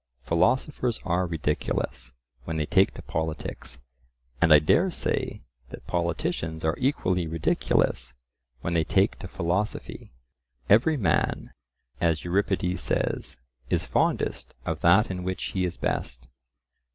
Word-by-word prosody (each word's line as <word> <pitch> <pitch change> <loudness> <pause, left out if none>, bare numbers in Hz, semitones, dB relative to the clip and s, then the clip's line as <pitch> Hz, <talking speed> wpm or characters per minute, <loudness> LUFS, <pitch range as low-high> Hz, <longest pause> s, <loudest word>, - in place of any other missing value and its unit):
Philosophers 130 - +1
are 90 0 +1
ridiculous 75 -6 -2 0.3
when 80 -1 -3
they 75 - 0
take 95 +3 +4
to - - -9
politics, 80 -4 -4 0.6
and 85 -2 +5
I 75 - +11
dare 160 - +3
say 175 - -2 0.3
that - - -10
politicians 80 -2 -2
are 80 - +2
equally 90 - +1
ridiculous 80 -4 0 0.5
when 85 - -2
they 85 -1 +3
take 75 - +2
to - - -7
philosophy: 90 +5 -3 0.6
"Every 135 +10 +5
man," 90 - 0 0.5
as 80 -2 +1
Euripides 90 0 0
says, 65 - -1 0.3
"is - - +1
fondest - - 0
of - - -2
that 95 +5 +5
in 90 -1 -4
which 95 0 -3
he 95 -1 +1
is 90 -1 -4
best." - - -3
85 Hz, 125 wpm, -26 LUFS, 80-95 Hz, 0.6 s, I